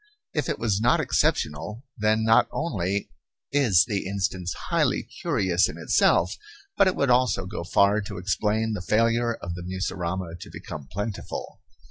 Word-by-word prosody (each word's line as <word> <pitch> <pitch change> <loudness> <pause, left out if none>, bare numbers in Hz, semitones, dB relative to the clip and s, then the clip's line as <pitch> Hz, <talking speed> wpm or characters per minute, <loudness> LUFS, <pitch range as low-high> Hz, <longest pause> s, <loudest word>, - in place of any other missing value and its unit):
If 150 +2 -1
it 150 - -1
was 105 -3 0
not 120 - +4
exceptional, 85 - 0
then 110 +1 +1
not 110 0 +5
only 100 - -2 0.4
is 115 -12 +4
the 100 -5 -2
instance 95 -2 -2 0.2
highly - - +2
curious 95 -1 0
in - - -7
itself, - - +2 0.4
but 195 - +5
it 185 - +1
would 140 -2 +2
also 125 -6 +2
go 95 -2 -5
far 100 +4 +3
to 100 -1 -7
explain 105 +4 0
the 105 - -3
failure 115 +4 +2
of 85 -4 -6
the 90 - -6
mussurama 90 -1 -3
to - - -10
become 70 -3 -8
plentiful. 105 +2 -5
100 Hz, 155 wpm, -25 LUFS, 90-115 Hz, 0.4 s, not